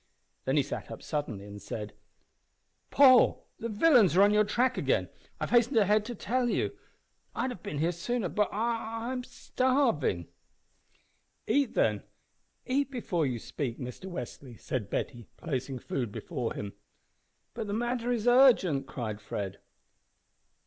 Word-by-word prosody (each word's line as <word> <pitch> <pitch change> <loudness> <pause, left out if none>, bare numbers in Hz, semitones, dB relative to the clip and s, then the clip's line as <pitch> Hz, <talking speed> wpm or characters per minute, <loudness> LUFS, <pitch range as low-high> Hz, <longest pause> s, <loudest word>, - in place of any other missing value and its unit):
Then 135 +3 +1
he 145 - +4
sat 140 - -6
up - - -8
suddenly, 125 -10 -3
and 105 0 -10
said 105 -1 -6 1.0
"Paul, 260 -3 +6
the 230 - -3
villains 220 - +5
are 195 - +8
on 205 +1 +5
your 210 0 +5
track 240 +5 +1
again. - - 0 0.3
I've - - -3
hastened 240 +1 +4
ahead 210 0 +4
to 240 +1 -5
tell 245 +4 0
you. - - -1 0.6
I'd 260 - -1
have 190 - -9
been 145 - -5
here 165 +4 +1
sooner 195 +5 -2
but 210 +4 0
but - - -6
I'm 230 +2 -2
starving." 250 - 0 1.2
"Eat, 280 -4 +1
then 105 -2 +2 0.6
eat 275 +2 0
before 210 - -1
you 125 -2 -2
speak, 120 +1 -4
Mr 125 +9 -7
Westly," 125 -5 -8
said 110 -7 -3
Betty, 120 +1 -4
placing 135 -4 -3
food 120 -2 -3
before 125 -1 -4
him. 100 -1 -5 0.8
"But 225 -2 -4
the 200 - -3
matter 240 +2 -1
is 240 -1 -1
urgent!" 230 - +5
cried 110 -4 -5
Fred. 100 -2 -5
200 Hz, 150 wpm, -29 LUFS, -, 1.2 s, are